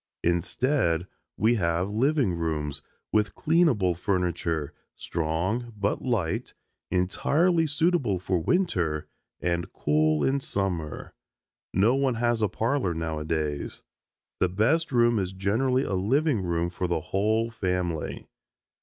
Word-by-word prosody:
Instead 85 - +1 0.3
we 115 +2 +3
have 85 +3 0
living 130 - +2
rooms, 75 -4 -2 0.3
with 105 -1 +1
cleanable 150 - +3
furniture, 85 -4 -1 0.2
strong 90 +9 -2
but 100 0 0
light, 105 -10 -1 0.3
entirely 160 - +2
suitable 150 - +1
for 90 0 -1
winter, 85 - 0 0.3
and 85 -1 -1
cool 75 0 +2
in 140 +1 +2
summer. 90 - -3 0.6
No 105 +6 +3
one 135 -2 +1
has 120 0 +1
a 105 - +2
parlor 115 - 0
now 80 -1 -3
a - - -4
days. 75 -2 -3 0.6
The 95 - +2
best 130 - +1
room 120 -2 +4
is 95 -1 -2
generally 120 +8 +1
a 100 - -3
living 125 - +2
room 85 -1 -1
for 90 +1 -2
the 85 -2 0
whole 110 +6 0
family. 90 -6 -2
95 Hz, 125 wpm, -27 LUFS, 85-120 Hz, 0.6 s, room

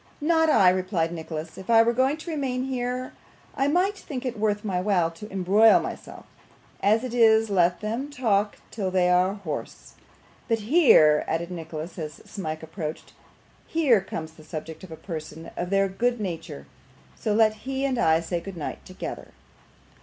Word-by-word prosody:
'Not 320 +1 +3
I,' 190 -11 +6
replied 185 -3 -1
Nicholas. 160 -1 -6
'If 190 - -11
I 225 -1 +7
were 235 +1 +2
going 260 +4 +2
to 325 +2 -7
remain 260 -4 -2
here, 255 -1 -3 0.4
I 270 - +1
might 365 +7 +2
think 270 -8 -7
it 245 -2 -2
worth 210 0 0
my 185 -3 -1
while 180 -4 +1
to 210 +6 -11
embroil 195 +4 +5
myself. - - -7 0.6
As 215 +4 +3
it 255 -2 -5
is, 225 -2 +4
let 175 -1 +2
them 230 +7 -3
talk 215 -7 0
till 200 -4 -2
they 180 -1 +2
are 180 +2 +3
hoarse. 170 -8 -7 0.5
But 225 -2 0
here,' 210 - +5
added 170 +2 -2
Nicholas, 165 0 -7
as 155 -2 -5
Smike 160 -5 -5
approached, 160 -1 -6 0.5
'here 280 -11 +3
comes 160 -4 -6
the 160 -1 -16
subject 155 +2 -7
of 185 - -10
a - - -6
portion 160 -2 -7
of 175 - -3
their 195 0 +3
good 240 +5 -1
nature, 165 - -5 0.5
so 210 - -1
let 220 -1 +4 0.2
he 270 0 -1
and 260 -3 0
I 160 -6 +3
say 170 +1 -2
good 195 0 -8
night 155 - -5
together. 185 - -7
200 Hz, 175 wpm, -25 LUFS, 170-245 Hz, 0.6 s, I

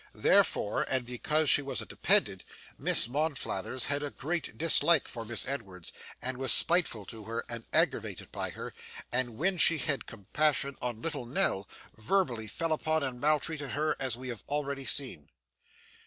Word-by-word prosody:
Therefore, 105 - +2
and 130 -2 -1
because 150 +6 -1
she 145 - +7
was 140 -1 -3
a - - -4
dependent, - - +3 0.3
Miss - - +3
Monflathers 130 -5 -2
had 145 0 -1
a 145 - -3
great 160 +5 -4
dislike 165 -1 +4
to 115 - -5
Miss 115 +1 0
Edwards, 100 -10 -6 0.3
and 130 0 -3
was 135 -2 +2
spiteful 165 - +1
to 110 0 -9
her, 115 +2 -4
and 115 -1 -6
aggravated - - -1
by - - -3
her, - - -8 0.4
and, 120 -2 0
when 185 +4 0
she 165 - +8
had 140 0 -2
compassion 140 +6 0
on 120 -2 -4
little 145 -7 -4
Nell, 120 - +1 0.3
verbally 115 - 0
fell 165 - -2
upon 155 0 0
and 125 -2 -4
maltreated 150 -1 0
her 155 +1 0
as 130 -4 -2
we 130 0 -8
have 120 -3 -7
already 140 -2 -3
seen. 120 - -1
135 Hz, 165 wpm, -30 LUFS, 115-155 Hz, 0.4 s, she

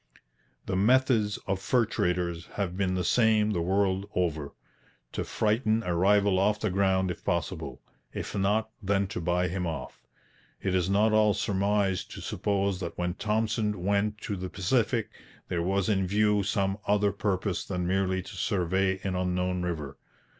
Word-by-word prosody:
The 95 - -2
methods 110 0 +3
of 95 -1 -1
fur 120 +5 +2
traders 90 -4 -1
have 95 -4 -2
been 95 -1 0
the 90 - 0
same 110 +1 +3
the 85 - 0
world 95 +2 0
over: 80 -5 -1 0.6
to - - -3
frighten 110 +1 +1
a 90 -3 -1
rival 100 +1 +3
off 105 +2 +2
the 110 - -1
ground 95 -1 +2
if - - -8
possible; - - -3 0.3
if - - -5
not, 105 +3 +1
then 100 0 +1
to 95 - -4
buy 90 +2 +1
him 90 0 -2
off. 80 - -6 0.6
It 95 - -1
is 90 -1 +1
not 105 +3 +3
all 105 -1 +4
surmise 100 -1 +1
to - - -10
suppose 100 -2 -1
that 85 -3 -5
when 90 0 -1
Thompson 105 -1 -1
was 100 +2 +2
sent 105 +1 0
to 105 - -3
the 95 -1 -5
Pacific 110 +4 0 0.4
there 85 -2 -1
was 95 +2 0
in 95 -3 +1
view 105 +1 +3
some 100 0 0
other 105 0 +3
purpose 100 -2 -1
than 90 -2 -3
merely 95 0 0
to - - -10
survey 95 -1 0
an 95 - -1
unknown 90 0 -1
river. 75 -6 -4
95 Hz, 170 wpm, -28 LUFS, 90-105 Hz, 0.6 s, all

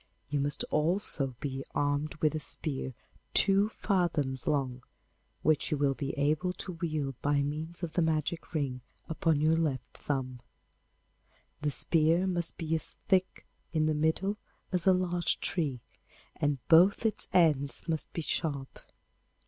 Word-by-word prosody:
You 145 - +1
must 145 +1 0
also 150 -5 0
be 135 -1 -4
armed 145 +1 0
with 155 0 +1
a 155 - -2
spear 135 -4 -3 0.4
two 200 +1 +5
fathoms 165 - -1
long, 135 -4 0 0.6
which 155 -2 +2
you 150 - 0
will 140 -1 +2
be 140 0 -4
able 155 +6 +1
to 185 - -5
wield 155 -6 -3
by 145 0 +2
means 155 +5 -5
of 165 -2 -3
the 175 - +2
magic 160 +1 -1
ring 135 -4 -1 0.3
upon 160 -1 +1
your 160 +1 +4
left 145 -6 -2
thumb. 130 -3 -3 1.2
The 150 - +1
spear 165 +4 +3
must 175 -3 -1
be 160 -1 -2
as 160 - 0
thick 185 -1 +1 0.3
in 155 -1 +2
the 155 - +2
middle 160 +7 0 0.3
as 180 -1 0
a - - +8
large 175 -1 0
tree, 145 -9 -1 0.5
and 145 -1 0
both 180 +7 +6
its 220 - +3
ends 150 -4 +2
must 160 -2 -2
be 165 - -4
sharp. 140 -4 -2
155 Hz, 150 wpm, -30 LUFS, 140-170 Hz, 1.2 s, a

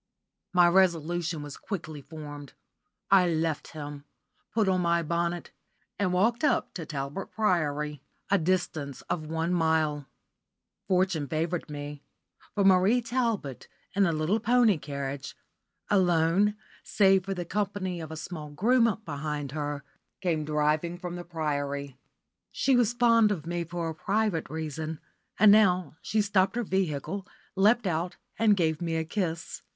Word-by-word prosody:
My 175 -1 +6
resolution 170 -3 +2
was 145 -1 -8
quickly 160 -7 -6
formed. 145 -2 -9 0.6
I 185 -3 +6
left 160 -2 -1
him, 145 -2 -7 0.5
put 220 -3 +1
on 185 -1 +2
my 170 -1 +2
bonnet, 170 +1 -2 0.5
and 195 -3 +1
walked 225 +8 +2
up 295 - +1
to 165 -4 -6
Talbot 145 +5 -4
Priory, 150 - 0 0.3
a 200 - +5
distance 160 -5 -1
of 155 -3 -2
one 165 +2 -1
mile. 160 -4 +1 0.8
Fortune 185 -5 +1
favoured 165 +3 -2
me, 145 -1 -6 0.5
for 205 - +2
Mabel 195 +5 +5
Talbot, 230 - -2 0.3
in 195 0 +3
a - - +2
little 160 +7 +1
pony 225 -5 +4
carriage, 140 -1 -5 0.5
alone 185 +1 +3 0.3
save 195 -2 +3
for 195 0 -2
the 175 -1 -4
company 190 -2 -2
of 160 - -7
a 160 - -7
small 155 -2 -6
groom 225 +6 +2
behind 145 -2 -4
her, 145 -1 -3 0.4
came 165 -5 0
driving 150 +3 0
from 175 -1 -6
the 175 - -6
Priory. 145 -5 -3 0.6
She 270 -1 +2
was 240 -2 +3
fond 230 -3 +4
of 165 -7 -3
me 175 0 -2
for 170 0 -4
a 160 - -3
private 200 0 -1
reason, 155 0 -4 0.4
and 210 0 +7
now 185 -7 +4
she 215 -1 +1
stopped 200 -1 +2
her 240 - 0
vehicle, 190 0 -2 0.3
leapt 215 +4 +4
out, 175 0 -1 0.2
and 215 -3 +4
gave 160 -2 +1
me 165 -1 -1
a 160 - 0
kiss. 165 -2 -3
170 Hz, 145 wpm, -28 LUFS, 155-195 Hz, 0.8 s, and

